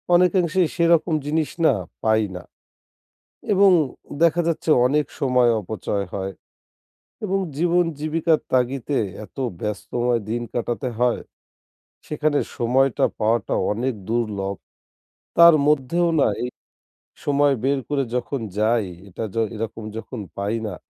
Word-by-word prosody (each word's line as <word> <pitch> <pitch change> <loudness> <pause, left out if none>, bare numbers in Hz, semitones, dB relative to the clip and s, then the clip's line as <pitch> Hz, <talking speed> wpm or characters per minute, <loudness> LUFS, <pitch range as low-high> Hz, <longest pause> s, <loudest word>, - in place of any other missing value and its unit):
অনেকাংশেই 180 -1 +3
সেরকম 170 -1 +3
জিনিস 155 +1 0 0.2
না, 140 - +6 0.3
পাই 110 0 +3
না। 90 - -7 1.1
এবং 195 0 +6 0.5
দেখা 170 +1 +4
যাচ্ছে 165 -1 -1 0.2
অনেক 145 +1 +1
সময় 125 -3 +3
অপচয় 100 0 -3
হয়। 95 0 -3 0.9
এবং 195 -1 0 0.2
জীবন-জীবিকার 165 -1 +1
তাগিদে 130 +2 +1 0.2
এত - - -28 0.2
ব্যস্তময় 120 +3 -1
দিন 120 +2 -1
কাটাতে 120 +2 -2
হয়, 125 -1 +2 0.8
সেখানে 150 -1 0 0.2
সময়টা 130 +1 +2
পাওয়াটা 110 -1 +1 0.2
অনেক 125 +4 -1 0.2
দুর্লভ। 105 -4 -1 0.8
তার 170 -1 +9
মধ্যেও 150 +4 +2
না - - +4
এই 125 - -1 0.8
সময় 145 0 +3
বের 140 +1 +2
করে 145 -2 +1
যখন 125 +1 -2 0.2
যাই 110 0 +2 0.2
এটা 100 +5 -5
য - - -9 0.2
এরকম 110 0 -5
যখন 115 +1 -6 0.2
পাই 100 +3 -1
না, 105 - -4
130 Hz, 120 wpm, -22 LUFS, 115-155 Hz, 1.1 s, তার